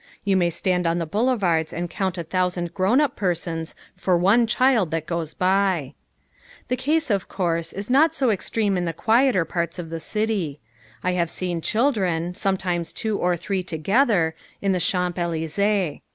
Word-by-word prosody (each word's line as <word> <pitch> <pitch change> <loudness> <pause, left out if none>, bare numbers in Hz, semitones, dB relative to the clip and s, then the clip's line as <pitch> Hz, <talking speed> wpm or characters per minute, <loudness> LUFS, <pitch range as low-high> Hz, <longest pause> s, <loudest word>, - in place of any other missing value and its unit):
You 195 -1 +2
may 175 -2 +3
stand 180 +1 0
on 165 +1 +1
the 170 - -1
boulevards 195 -5 +1
and 175 +1 -3
count 190 0 -2
a 170 - -3
thousand 180 0 -1
grown 200 +7 +3
up 285 -3 +1
persons 170 -3 -2 0.2
for 180 -1 +1
one 205 +7 +4
child 240 -5 +3
that 160 0 -2
goes 170 -2 -3
by. 185 -5 +1 0.8
The 250 - +2
case, 295 +2 0
of 195 -2 0
course, 170 -3 -1
is 200 +2 -5
not 285 +6 +4
so 260 -4 +2
extreme 205 0 0
in 175 - -1
the 165 - -2
quieter 225 - +3
parts 170 +1 -3
of 165 -2 -6
the 165 - -3
city. 200 -7 -2 0.4
I 185 - +1
have 170 -2 0
seen 175 -2 -3
children, 185 - 0
sometimes 180 -3 -1
two 215 -2 -2
or 180 0 +1
three 190 +2 -2
together, 180 - +1 0.3
in 195 - 0
the 185 - +1
Champs 180 0 0
Elysées. 170 +2 0
180 Hz, 175 wpm, -23 LUFS, 170-210 Hz, 0.8 s, one